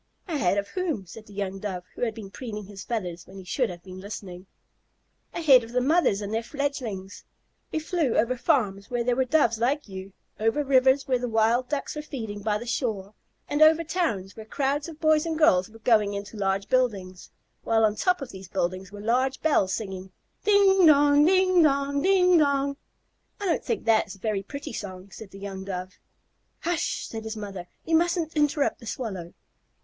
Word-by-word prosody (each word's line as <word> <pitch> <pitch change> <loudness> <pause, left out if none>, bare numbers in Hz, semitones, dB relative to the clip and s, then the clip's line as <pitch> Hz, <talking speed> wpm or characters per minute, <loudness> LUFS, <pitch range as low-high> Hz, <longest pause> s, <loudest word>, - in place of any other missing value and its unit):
"Ahead 205 - +1
of 200 0 -2
whom?" 340 - -2
said 215 +5 -12
the 205 - -14
young 195 -1 -4
Dove, 190 -3 -4
who - - -11
had 225 -3 0
been 205 -4 -9
preening 210 -3 -6
his 200 0 -9
feathers 180 -7 -4
when 190 - -12
he 190 - -9
should 225 +6 -1
have 175 -1 -9
been 185 -1 -10
listening. 190 -2 -8 0.8
"Ahead 280 -8 +5
of 230 +1 -10
the 250 - +3
mothers 270 - +2
and 205 +1 -4
their 225 - 0
fledglings. 235 -8 -4 0.5
We - - -1
flew 315 -5 0
over 235 +3 +2
farms 205 -5 0
where 240 -1 -1
there 245 0 +1
were 260 +1 +1
Doves 250 -5 +2
like 275 +5 0
you; 190 0 -8 0.3
over 225 +7 +1
rivers 265 0 +3
where 255 -2 +2
the 245 0 -3
Wild 230 +3 +2
Ducks 290 0 -3
were 300 - -3
feeding 220 -9 -6
by 210 0 0
the 235 - -8
shore; 220 -5 -2 0.3
and 290 +1 -1
over 315 +1 +6
towns 300 - -2
where 220 - -8
crowds 285 +5 -1
of 315 -2 -11
boys 310 0 +3
and 320 -1 -2
girls 190 - +4
were 225 - -14
going 215 -3 +2
into 200 +2 -6
large 195 -1 -1
buildings, 200 -8 -1 0.3
while 225 -1 +3
on 210 -1 +1
top 360 - +1
of 250 - -9
these 190 -1 -10
buildings 185 +2 -2
were 205 0 -9
large 255 +5 +1
bells 285 -12 +3
singing, 190 -2 -5 0.3
'Ding 395 -3 +5
dong, 290 -1 +6
ding 370 +1 +4
dong, 280 -1 +2
ding 365 -1 +5
dong.'" 280 -1 +1 0.6
"I 405 - -4
don't 350 - 0
think 460 - -2
that 225 -1 +4
was 195 - -10
a - - -17
very 205 0 -1
pretty 280 +5 -7
song," 190 -2 -7
said 215 0 -10
the 195 - -12
young 195 -1 -6
Dove. 185 -1 -6 0.6
"Hush," 345 -1 -1
said 225 -1 -6
his 220 0 -5
mother, 195 -4 -7 0.2
"you 325 - +2
mustn't 340 -1 +1
interrupt 295 -1 +1
the 230 - -11
Swallow." 190 -8 -5
230 Hz, 200 wpm, -26 LUFS, 195-290 Hz, 0.8 s, over